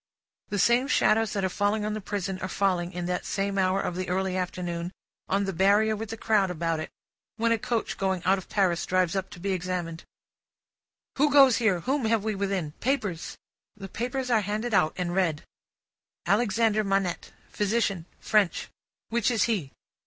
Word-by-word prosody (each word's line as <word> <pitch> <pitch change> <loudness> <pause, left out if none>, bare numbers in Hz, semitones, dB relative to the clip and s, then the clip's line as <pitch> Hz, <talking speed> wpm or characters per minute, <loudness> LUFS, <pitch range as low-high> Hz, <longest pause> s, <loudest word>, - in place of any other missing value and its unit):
The 205 - -2
same 240 +6 +3
shadows 220 -5 +3
that 195 -2 0
are - - +3
falling 205 +3 0
on 210 - -1
the 215 - -4
prison, 195 -1 -3
are 185 - -3
falling, 185 -3 0
in 180 -2 -4
that 180 0 -2
same 195 0 -1
hour 190 +1 +2
of 180 - -2
the 185 0 -3
early 190 0 0
afternoon, 175 -1 -3 0.4
on 200 +1 +2
the 195 -1 -2
Barrier 205 +5 +3
with 220 0 -6
the 225 - -5
crowd 210 -4 +2
about 165 -2 -1
it, 155 - -5 0.5
when 230 +1 +1
a 230 - +2
coach 230 +1 -2
going 190 -2 0
out 190 +1 +3
of 190 - -13
Paris 185 -5 +1
drives 185 -1 +1
up 190 -1 -2
to - - -11
be 195 +3 -2
examined. 175 -2 -3 1.2
"Who 295 +1 +5
goes 270 -4 +7
here? 200 -7 +2
Whom 270 - 0
have 220 -2 +2
we 220 0 -1
within? 195 -6 -2
Papers!" 215 -10 -2 0.4
The 195 -1 -7
papers 250 +4 -3
are 225 -2 +4
handed 215 +4 -3
out, 155 -5 +3
and 175 -1 -2
read. 170 -5 0 0.8
"Alexandre 215 +2 +2
Manette. 195 -4 -1 0.2
Physician. 205 -4 0
French. 210 -5 +1 0.4
Which 235 0 +1
is 230 -4 +2
he?" 190 -13 -1
195 Hz, 180 wpm, -27 LUFS, 180-220 Hz, 1.2 s, goes